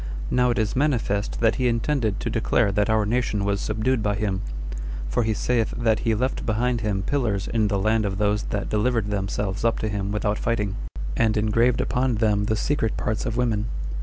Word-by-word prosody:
Now 125 0 +3
it 120 - 0
is 110 -2 0
manifest 120 -8 0
that 115 -1 +3
he 125 - +3
intended 115 -2 0
to - - -2
declare 100 - +2
that 105 +2 +1
our 110 -1 +3
nation 110 -2 0
was 100 0 0
subdued 110 +3 0
by 105 -1 0
him; 100 -2 -1 0.7
for - - 0
he 110 -1 0
saith 115 0 0
that 110 -2 +2
he 115 -1 +1
left 125 +4 -1
behind 120 +2 0
him 100 -3 -1
pillars 110 -7 0
in 110 -2 +1
the 100 -1 0
land 110 +3 +2
of 100 -2 -2
those 105 0 +1
that 100 -1 -3
delivered 110 -1 +1
themselves 100 0 -2
up 115 -1 +2
to 110 - -2
him 100 -1 -2
without 105 0 0
fighting, 105 -4 -1 0.4
and 110 -2 +2
engraved 115 +3 +2
upon 125 -1 +1
them 105 -2 +2
the 110 0 +1
secret 115 0 0
parts 110 0 -1
of 115 0 -2
women. 115 -3 +1
110 Hz, 200 wpm, -24 LUFS, 105-115 Hz, 0.7 s, Now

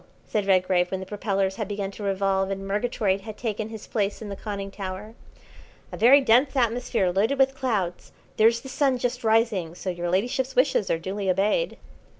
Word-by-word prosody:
said 205 -2 -2
Redgrave, 185 -2 +3
when 190 - -3
the 190 - -6
propellers 195 -1 -1
had 215 - -3
begun 200 -1 -3
to 205 - -11
revolve 195 -1 0
and 195 0 -4
Murgatroyd 205 -2 0
had 215 0 -9
taken 220 -2 -3
his 220 -1 -8
place 205 -2 -1
in 215 - -7
the 200 - -5
conning 200 -1 -5
tower. 195 +2 -6 0.8
"A - - -5
very 265 +5 +7
dense 260 +3 +3
atmosphere 235 -5 +1
loaded 215 +9 +1
with 270 0 +3
clouds. 210 -10 -2 0.3
There's 230 +2 +4
the 270 - -10
Sun 265 -1 +1
just 245 0 -2
rising, 220 -7 +1
so 185 - -4
your 175 0 -3
ladyship's 250 +8 0
wishes 255 -6 +2
are - - +2
duly 190 +3 -3
obeyed." 205 - +1
205 Hz, 185 wpm, -25 LUFS, 195-235 Hz, 0.8 s, very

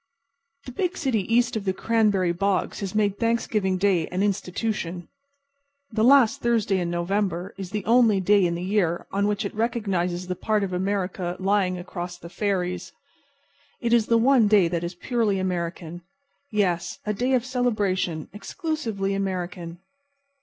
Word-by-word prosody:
The 255 - -7
big 360 +8 -2
city 230 - -1
east 240 0 +3
of 220 - -2
the 190 -1 0
cranberry 205 -4 +2
bogs 195 +2 -1
has 195 0 -5
made 205 -2 +1
Thanksgiving 220 -5 0
Day 185 -4 +2
an 185 +2 -1
institution. 185 -3 -2 0.8
The 220 -1 0
last 260 -2 +5
Thursday 225 -5 +1
in 175 -1 -2
November 180 +1 -1
is 190 -2 -6
the 210 0 -4
only 230 -3 +4
day 200 +1 +4
in 170 - -2
the 175 - -4
year 185 -3 0
on 200 +1 +1
which 210 -1 -1
it - - -4
recognizes 195 -6 -1
the 180 0 -3
part 215 +2 0
of 190 -2 -3
America 185 -1 -2
lying 190 -1 +1
across 175 0 -6
the 170 -1 -11
ferries. 180 -2 -2 0.9
It 235 -1 0
is 230 -2 +4
the 230 - +4
one 240 -1 +4
day 205 -4 +5
that 170 0 -2
is 175 +1 -4
purely 220 0 0
American. 175 -2 -3 0.5
Yes, 185 -5 0
a 210 - 0
day 250 +6 0
of 245 -1 0
celebration, 205 - -1
exclusively 225 - -3
American. 180 -3 -3
195 Hz, 160 wpm, -25 LUFS, 180-220 Hz, 0.9 s, last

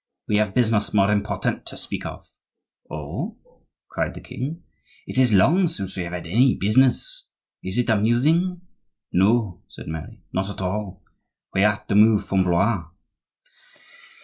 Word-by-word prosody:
We 105 - +2
have 105 -2 0
business 110 -4 +1
more 100 0 +4
important 105 0 -1
to - - -6
speak - - -3
of." - - -10 0.6
"Oh!" 75 -1 -5 0.5
cried - - -3
the - - -8
king, 155 +7 -6 0.4
"it - - -2
is 125 -3 +4
long 160 - +4
since 100 - -5
we 95 - -3
have 85 - -7
had 90 - -5
any 120 +10 +3
business. 130 - +1 0.4
Is 95 +3 -3
it 125 - +1
amusing?" 140 - +2 0.5
"No," 100 -1 +2
said - - -11
Mary, 80 0 -7
"not 95 +1 -1
at 100 - -7
all; 95 0 -4 0.5
we 95 - +3
are 105 0 +2
to - - -2
move 105 -1 +5
from 95 -2 +2
Blois." 90 +1 +1
105 Hz, 150 wpm, -23 LUFS, 95-125 Hz, 0.6 s, move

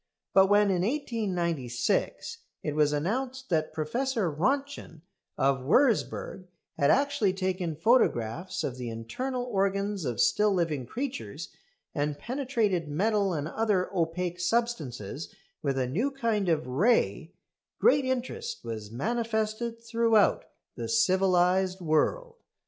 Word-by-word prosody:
But 190 0 +6
when, 205 0 +4
in 180 -2 +1
1896, 180 - -1 0.2
it 150 - -2
was 150 -1 +3
announced 250 - -2
that 155 -2 +1
Professor 190 - -1
Röntgen 270 - -2 0.4
of 135 0 +2
Würzburg 195 - +1 0.3
had 140 - +2
actually 275 -9 +2
taken 185 -3 -2
photographs 170 - +1
of 130 - -3
the 125 -2 -5
internal 245 - -4
organs 200 -3 -1
of 125 -5 -3
still 210 0 +3
living 160 -9 -1
creatures, 270 +3 -5 0.4
and 145 -1 -1
penetrated 235 - -1
metal 200 +6 +1
and 150 -2 -2
other 200 -1 0
opaque 175 +1 -1
substances 165 - -2 0.3
with 135 -2 -1
a 130 - +1
new 190 - 0
kind 230 -8 -1
of 160 -2 +1
ray, 195 - +1 0.4
great 450 - +4
interest 260 - -3
was 110 -2 -6
manifested 220 - -2
throughout 230 -2 +3 0.3
the 115 -1 -5
civilised 185 +3 +3
world. 465 - 0
190 Hz, 120 wpm, -28 LUFS, 155-235 Hz, 0.4 s, But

